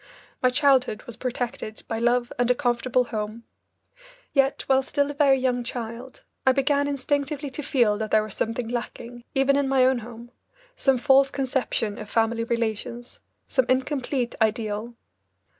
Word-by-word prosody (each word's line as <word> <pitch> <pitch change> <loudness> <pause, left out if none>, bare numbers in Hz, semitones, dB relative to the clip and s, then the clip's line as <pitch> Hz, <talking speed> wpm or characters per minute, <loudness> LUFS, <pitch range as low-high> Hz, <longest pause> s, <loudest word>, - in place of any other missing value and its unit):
My 255 - +4
childhood 255 -4 +2
was 240 - -9
protected 240 -3 -4
by 225 - -2
love 240 +1 +1
and 245 0 +2
a 250 - +4
comfortable 250 -1 +1
home. 220 0 -5 0.9
Yet, 275 -1 +2
while 265 0 +4
still 285 +2 -1
a - - -6
very 280 -2 +4
young 250 -1 0
child, 235 +1 -7 0.2
I 260 - +5
began 280 +1 +2
instinctively 285 +1 -2
to 280 - -4
feel 235 -7 +2
that 220 -1 -3
there 215 0 +3
was 215 -2 -5
something 230 +1 -2
lacking, 240 0 -6
even 270 +1 +3
in 280 -1 +1
my 265 -1 +4
own 260 -1 +3
home, 235 +1 -11 0.4
some 270 -2 +2
false 270 +2 +5
conception 255 -6 -1
of 210 - -8
family 230 0 +1
relations, 235 +1 -3 0.3
some 260 -2 +1
incomplete 260 -1 0
ideal. 220 +1 -1
245 Hz, 160 wpm, -25 LUFS, 230-270 Hz, 0.9 s, I